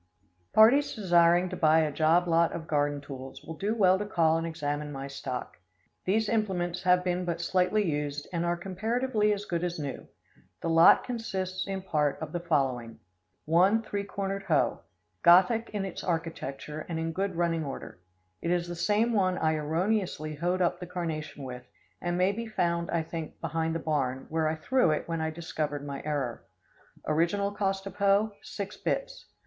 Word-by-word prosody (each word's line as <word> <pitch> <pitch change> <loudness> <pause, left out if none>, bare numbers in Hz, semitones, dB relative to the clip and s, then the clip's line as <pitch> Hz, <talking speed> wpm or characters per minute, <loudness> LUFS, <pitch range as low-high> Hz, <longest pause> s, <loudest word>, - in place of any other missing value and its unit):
Parties 245 +7 +5
desiring 175 -3 +4
to - - -4
buy 160 0 +4
a 155 -1 0
job 160 +4 +3
lot 165 0 +3
of 160 - -5
garden 145 -1 0
tools, 135 -2 -9
will 160 - -7
do 200 +8 -2
well 190 -3 +4
to 210 - -2
call 160 -5 +3
and 165 0 -1
examine 150 -2 -3
my 135 -1 -5
stock. 135 -2 -6 0.5
These 215 +3 +2
implements 185 -6 -1
have 180 -1 +4
been 180 0 0
but 170 -1 -2
slightly 185 +4 +2
used, 145 -1 -2
and 170 -1 0
are 175 0 0
comparatively 215 +5 0
as 205 0 -2
good 175 -3 -2
as 175 -1 -2
new. 145 -3 -5 0.6
The 165 - 0
lot 165 +1 +7
consists 190 -6 -3
in 195 -1 -3
part 150 -6 0
of 160 -1 -6
the 175 - -2
following: 135 -9 -1 0.5
One 185 +8 +4
three 205 -2 -3
cornered 195 0 -3
hoe, - - +1 0.4
Gothic 190 +7 +5
in 205 -2 -2
its 190 - -6
architecture 155 -3 -4
and 165 - -2
in 165 0 -2
good 190 +2 -2
running 165 -1 0
order. 135 -9 -7 0.4
It 170 - -2
is 175 0 +1
the 175 - -5
same 215 +6 +1
one 185 -3 +2
I 160 0 +2
erroneously 160 +1 -1
hoed 175 +5 0
up 175 - 0
the 180 - -7
carnation 160 -5 -4
with, 125 -1 -8 0.3
and 175 0 -1
may 185 +2 +3
be 230 +3 -5
found, 170 -5 0
I 170 -1 0
think, 160 0 -7
behind 165 0 -1
the - - -1
barn, 135 -5 -1
where 160 0 +1
I 160 - -1
threw 250 +5 +2
it 155 - -1
when 165 -1 -2
I 160 - 0
discovered 155 -3 -4
my 140 -1 -5
error. 140 -6 -2 0.6
Original 170 +6 +1
cost 195 -1 -1
of 195 - -8
hoe, 200 +2 +3
six 200 0 -6
bits. - - -3
170 Hz, 185 wpm, -29 LUFS, 155-195 Hz, 0.6 s, lot